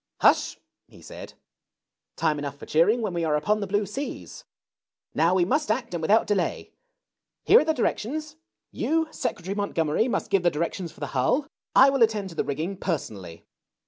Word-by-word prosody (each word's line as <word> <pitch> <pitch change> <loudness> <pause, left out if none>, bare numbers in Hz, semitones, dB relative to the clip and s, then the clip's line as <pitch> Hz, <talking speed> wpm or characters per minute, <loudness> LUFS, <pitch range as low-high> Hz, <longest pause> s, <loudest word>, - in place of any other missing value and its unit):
" - - -62
Hush! - - +4 0.2
" - - -59
he - - -17
said: - - -11 0.8
"time 155 -2 0
enough 140 -1 -5
for - - -10
cheering 210 +10 +3
when 205 -4 -2
we 170 -1 -1
are 155 -2 +1
upon 210 +9 +1
the 200 - -3
blue 205 +2 0
seas. 270 +9 -7 0.7
Now 170 +3 +3
we 180 -2 +3
must 295 - 0
act, 235 -1 -1
and 170 - -3
without 210 +8 +3
delay. 200 -4 -1 0.7
Here - - +7
are - - +2
the 315 - +1
directions. 300 +6 -2 0.4
You, 320 +1 0
Secretary 190 -7 -3
Montgomery, 200 -1 0
must 245 - -2
give 195 -2 +3
the 175 - +3
directions 170 +2 -3
for - - -19
the 145 - -5
hull. 140 - +1 0.3
I 275 +1 +7
will 270 -2 -1
attend 215 -4 +2
to 165 - -11
the - - 0
rigging 160 +7 -3
personally. 100 - -5
195 Hz, 190 wpm, -25 LUFS, 160-230 Hz, 0.8 s, Here